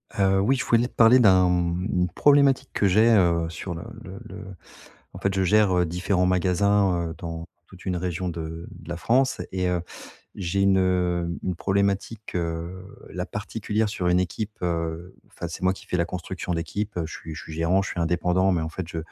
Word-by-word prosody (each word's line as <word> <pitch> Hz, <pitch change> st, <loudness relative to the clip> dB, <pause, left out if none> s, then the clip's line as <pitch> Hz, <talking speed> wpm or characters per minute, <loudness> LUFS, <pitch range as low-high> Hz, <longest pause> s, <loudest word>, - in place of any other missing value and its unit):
Heu, 95 Hz, -1 st, +3 dB
oui 120 Hz, +8 st, +3 dB
je 130 Hz, -, -2 dB
voulais 120 Hz, +1 st, +3 dB
te -, -, -19 dB
parler 120 Hz, +2 st, +6 dB
d'un, 95 Hz, -5 st, +6 dB
hem, 90 Hz, 0 st, 0 dB
une 90 Hz, 0 st, +1 dB
problématique 140 Hz, -, +4 dB
que 100 Hz, -, +2 dB
j'ai, 110 Hz, +5 st, +5 dB
heu, 85 Hz, -6 st, +3 dB
sur 85 Hz, +2 st, -6 dB
le 85 Hz, -, -7 dB, 0.2 s
le -, -, -9 dB
le -, -, -9 dB, 0.7 s
en -, -, -7 dB
fait 100 Hz, -1 st, -1 dB
je 95 Hz, -, +1 dB
gère, 100 Hz, 0 st, +4 dB
heu, 90 Hz, -, +3 dB
différents 90 Hz, +2 st, 0 dB
magasins, 90 Hz, 0 st, +2 dB
heu, -, -, -6 dB
dans 85 Hz, -1 st, -6 dB, 0.2 s
toute 95 Hz, -, -15 dB
une 90 Hz, -1 st, 0 dB
région 90 Hz, 0 st, -2 dB
de 80 Hz, 0 st, -6 dB
de 80 Hz, -, -13 dB
la 85 Hz, -, -3 dB
France. 130 Hz, +8 st, +1 dB
Et 95 Hz, -1 st, -1 dB
heu, 90 Hz, -1 st, 0 dB, 0.5 s
j'ai 100 Hz, 0 st, -1 dB
une 90 Hz, -3 st, +1 dB
une 90 Hz, -2 st, -2 dB
problématique, 100 Hz, +2 st, -1 dB
heu, 85 Hz, +2 st, -4 dB, 0.3 s
là -, -, -4 dB
particulière 110 Hz, +1 st, -2 dB
sur 100 Hz, -4 st, -3 dB
une 90 Hz, +1 st, +3 dB
équipe, 105 Hz, +4 st, -4 dB
heu 85 Hz, +1 st, -2 dB
enfin 85 Hz, -, -7 dB
c'est 85 Hz, -, -8 dB
moi 95 Hz, 0 st, +3 dB
qui 95 Hz, -, -12 dB
fais -, -, -1 dB
la 85 Hz, -, +2 dB
construction 90 Hz, +1 st, -4 dB
d'équipe, 100 Hz, +5 st, -3 dB
heu, 85 Hz, -, 0 dB
je -, -, -10 dB
suis 80 Hz, -1 st, -8 dB
je 75 Hz, -, -8 dB
suis -, -, -10 dB
gérant, 85 Hz, +4 st, +1 dB
je 100 Hz, -, -4 dB
suis 85 Hz, -, -3 dB
indépendant, 90 Hz, +3 st, +2 dB
mais 85 Hz, -3 st, 0 dB
en 80 Hz, -, -3 dB
fait 85 Hz, +2 st, -6 dB
je 85 Hz, -, -5 dB
90 Hz, 210 wpm, -25 LUFS, 85-100 Hz, 0.7 s, parler